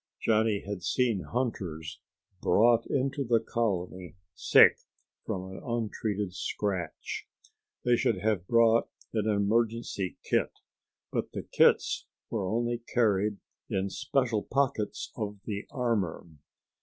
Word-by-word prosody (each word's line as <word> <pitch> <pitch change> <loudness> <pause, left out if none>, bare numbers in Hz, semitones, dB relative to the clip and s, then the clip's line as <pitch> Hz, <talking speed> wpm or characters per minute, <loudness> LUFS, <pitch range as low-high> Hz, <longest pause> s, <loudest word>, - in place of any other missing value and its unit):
Johnny 110 -2 +2
had 100 -2 -4
seen 115 -3 +1
hunters 95 -11 -3 0.4
brought 115 +5 +4
into 135 +1 0
the 115 -2 +3
colony 95 -6 -2 0.2
sick - - +6 0.5
from 95 0 -3
an 95 - -8
untreated 105 -4 -2
scratch. 95 -2 -3 0.6
They 120 0 +5
should 110 - +1
have 100 -2 0
brought 115 -1 +4 0.2
an 110 -1 0
emergency 105 -1 0
kit, - - +1 0.6
but - - -2
the - - -4
kits - - +3 0.2
were 100 -5 -1
only 120 +1 0
carried 105 -3 +2 0.3
in 95 0 -1
special 120 -4 0
pockets 135 -6 -1
of 105 -2 -4
the 100 -2 -4
armor. 115 -11 -1
110 Hz, 115 wpm, -29 LUFS, 95-115 Hz, 0.6 s, sick